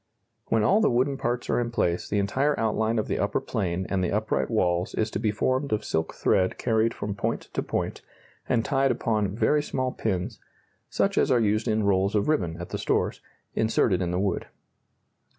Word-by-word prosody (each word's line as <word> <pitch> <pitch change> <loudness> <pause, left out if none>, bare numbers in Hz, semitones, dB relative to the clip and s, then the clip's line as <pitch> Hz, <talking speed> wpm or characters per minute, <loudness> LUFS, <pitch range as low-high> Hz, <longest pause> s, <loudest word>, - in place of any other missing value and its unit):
When 110 -1 +2
all 205 - +4
the - - +4
wooden 130 +3 +1
parts 120 -2 -2
are - - +1
in 120 -1 -1
place 90 -7 -1
the 105 - 0
entire 135 +9 +1
outline 110 +1 +1
of 110 - 0
the - - -1
upper - - +1
plane 90 0 -2
and 95 -2 0
the 90 - 0
upright 110 +2 0
walls 90 -5 0
is 110 0 0
to - - -2
be 110 0 +1
formed 130 +6 0
of 110 - 0
silk 80 0 -1
thread 95 0 +1
carried 115 -1 +2
from 105 0 -3
point 100 - -2
to - - 0
point, - - -3 0.5
and 115 -2 +2
tied 135 0 +2
upon 110 -5 0
very 150 +5 +3
small 130 -3 -2
pins 105 0 -3 0.5
(such - - +1
as - - +2
are 125 - +4
used 110 +1 +1
in 110 -1 +1
rolls 100 +1 +2
of 105 +6 +1
ribbon 85 - 0
at 85 - -6
the - - -4
stores) - - 0 0.3
inserted 110 -3 +2
in 90 - -1
the 90 - -1
wood. 100 -2 -1
110 Hz, 205 wpm, -26 LUFS, 95-120 Hz, 0.5 s, all